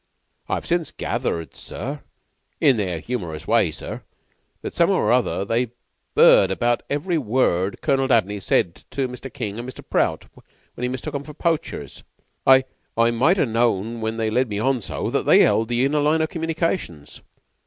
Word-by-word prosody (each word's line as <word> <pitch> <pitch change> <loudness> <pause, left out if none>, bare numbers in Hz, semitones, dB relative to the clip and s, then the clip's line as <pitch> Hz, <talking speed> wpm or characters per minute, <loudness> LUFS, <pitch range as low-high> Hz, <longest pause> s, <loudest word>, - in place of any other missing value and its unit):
I've - - -2
since 170 -2 -1
gathered, 85 -1 -3
sir, 140 +3 -6 0.6
in 135 -6 +4
their 95 -5 -1
humorous 80 -7 -5
way, 115 -6 +3
sir, 80 - -7 0.6
that - - -5
some'ow - - +3
or - - +2
other 100 - +1
they've 115 +3 0 0.5
'eard 95 - +7
about 120 +5 +1
every 160 +4 0
word 105 -7 0
Colonel 135 -1 +2
Dabney 105 -5 +2
said 90 -2 0
to 135 -2 -1
Mr. 125 +2 -8
King 110 -6 -5
and 120 +2 -6
Mr. 130 - -11
Prout - - 0 0.5
when - - -10
he 125 - 0
mistook 130 +4 -5
'em 140 -1 -3
for 150 0 -11
poachers. 160 - -2 0.5
I 130 0 +7 0.3
I 115 0 +4
might 135 +11 +3
ha' 170 - +3
known 115 -1 0
when 110 +1 -2
they 110 -1 -1
led 125 +2 +1
me 105 - -3
on 130 +3 +1
so - - -4
that - - -1
they - - +7
'eld 115 - +2
the 120 +2 +1
inner 150 +2 +1
line 155 +2 +2
of 160 - -1
communications. 165 - -3
120 Hz, 175 wpm, -22 LUFS, 105-140 Hz, 0.6 s, eard